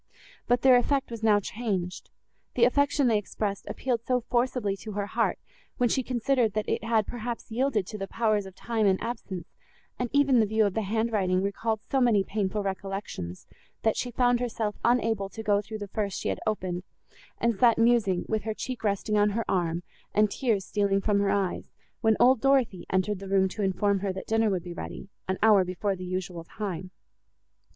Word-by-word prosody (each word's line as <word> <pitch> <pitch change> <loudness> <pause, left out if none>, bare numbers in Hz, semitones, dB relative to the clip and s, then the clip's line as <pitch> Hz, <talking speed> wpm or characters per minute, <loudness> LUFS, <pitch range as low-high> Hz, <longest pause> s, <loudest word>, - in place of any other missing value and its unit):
But 245 0 +2
their 260 -2 +7
effect 270 +1 0
was 230 -2 -6
now 215 -2 +4
changed; 195 -4 -3 0.5
the 240 - +3
affection 285 +3 +3
they 225 -3 +3
expressed 200 0 -4
appealed 245 -3 -1
so 250 0 +1
forcibly 240 -4 0
to 215 +2 -8
her 200 0 -2
heart, - - 0 0.4
when 245 -1 +2
she 265 - +1
considered 245 -2 +1
that 215 0 -2
it - - -1
had, 225 -2 +2
perhaps, 240 -1 -5
yielded 235 -4 +1
to 215 +2 -7
the 195 - -3
powers 215 -2 0
of 190 - -12
time 225 -1 0
and 190 -1 +3
absence, 205 -7 -5 0.5
and 245 -1 -1
even 280 -3 +4
the 220 - +3
view 220 +1 +2
of 200 - 0
the 220 - 0
hand 220 +3 -1
writing 185 -3 +1
recalled 220 +2 -1
so 270 - +2
many 225 -5 +4
painful 205 0 -2
recollections, 195 - -5 0.4
that 220 - +2
she 250 - -2
found 245 0 +2
herself 225 -3 -2
unable 225 -4 +2
to 220 - -8
go 205 -1 +2
through 215 +1 -7
the 205 -1 -6
first 200 -1 -2
she - - -2
had - - -2
opened, 185 -4 -1 0.6
and 235 -3 0
sat 235 -3 +5
musing, 225 -6 +3
with 220 -1 0
her 220 -1 -3
cheek 255 -1 -5
resting 210 0 +1
on 205 0 +4
her 225 +2 -2
arm, 175 -2 0 0.3
and 210 -1 +4
tears 220 -7 0
stealing 200 -1 +1
from 200 0 +1
her 200 0 +2
eyes, 195 -2 -1 0.3
when 220 -1 +3
old 255 -2 +5
Dorothée 260 -9 +2
entered 190 +2 0
the 195 0 -8
room 190 -1 +3
to 210 - -5
inform 200 +1 +1
her, 195 0 -1
that 190 - -6
dinner 225 0 +2
would 185 -4 -1
be 175 - -7
ready, 190 - -7 0.2
an 190 0 -1
hour 210 -3 +6
before 185 +2 -2
the 185 0 -7
usual 180 -2 -4
time. 185 -1 -5
210 Hz, 200 wpm, -27 LUFS, 195-235 Hz, 0.6 s, their